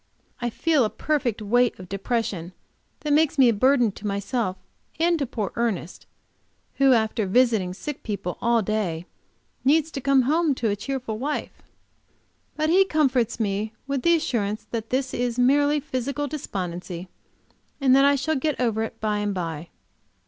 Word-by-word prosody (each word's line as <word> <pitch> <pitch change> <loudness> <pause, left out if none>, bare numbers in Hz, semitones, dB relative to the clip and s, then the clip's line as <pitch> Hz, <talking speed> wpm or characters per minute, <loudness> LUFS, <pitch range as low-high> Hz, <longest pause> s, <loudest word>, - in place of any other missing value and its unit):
I 240 - 0
feel 305 +3 +2
a 215 - +1
perfect 250 -8 -1
weight 245 +3 +2
of 185 - -10
depression 195 -3 -2 0.5
that 300 -1 0
makes 315 0 +3
me 260 -3 +6
a - - +3
burden 245 +1 +3
to 205 +2 -7
myself 200 0 -2 0.4
and 335 0 +3
to 280 - -1
poor 215 -4 -3
Ernest, 210 -7 -3 0.7
who, 275 -1 +5
after 220 -2 +1
visiting 220 -4 +3
sick 270 +10 -6
people 200 -5 -4
all 235 -1 +2
day, 185 -5 -2 0.6
needs 310 +3 +3
to 275 - -5
come 275 0 +4
home 305 +2 +2
to 230 -3 -1
a - - 0
cheerful 235 0 -4
wife. 290 +4 -4 0.9
But 310 +1 +1
he 380 +3 +6
comforts 270 - +1
me 210 +1 -1
with 275 -1 -2
the 340 +3 +4
assurance 215 -9 -1
that 225 -1 -4
this 260 0 -1
is 245 -1 -1
merely 285 +4 +3
physical 280 0 -3
despondency, 180 - -5 0.7
and 265 -2 +5
that 275 - +6
I 280 0 +5
shall 315 +4 0
get 300 +1 -1
over 225 -3 +1
it 225 - -5
by 210 -1 0
and 205 -1 -1
by. 165 -2 -4
240 Hz, 165 wpm, -24 LUFS, 205-280 Hz, 0.9 s, me